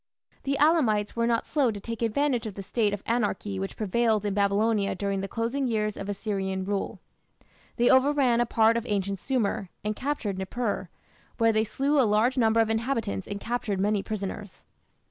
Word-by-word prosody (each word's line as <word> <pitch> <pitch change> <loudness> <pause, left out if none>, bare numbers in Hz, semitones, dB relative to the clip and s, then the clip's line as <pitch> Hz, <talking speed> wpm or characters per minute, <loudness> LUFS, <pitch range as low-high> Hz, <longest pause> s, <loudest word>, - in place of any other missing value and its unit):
The 275 0 0
Elamites 265 -10 +3
were 230 0 +1
not 230 -1 +1
slow 285 -5 +1
to 210 -2 -4
take 230 +2 -6
advantage 240 +1 +1
of 205 - -7
the 195 - -6
state 210 +2 0
of 205 -1 -4
anarchy 210 -4 -1
which 195 0 -5
prevailed 215 0 +1
in 205 - 0
Babylonia 200 +1 +1
during 200 0 -2
the 195 - -3
closing 235 +6 -1
years 215 -2 0
of 195 - -6
Assyrian 195 -2 -2
rule. 200 0 -3 0.8
They 240 0 +2
overran 260 -2 +4
a 240 - +1
part 225 0 +3
of 235 - -3
ancient 200 -1 -1
Sumer, 220 -7 -1
and 210 0 -1
captured 250 -8 -2
Nippur, 200 -1 -3 0.5
where 225 -1 +3
they 215 0 +3
slew 275 +7 0
a - - +7
large 225 +3 +3
number 230 -3 +3
of 225 -1 +3
inhabitants 225 - -1
and 200 - -4
captured 220 -4 -2
many 205 +1 +1
prisoners. 200 -1 -6
220 Hz, 185 wpm, -27 LUFS, 200-240 Hz, 0.8 s, a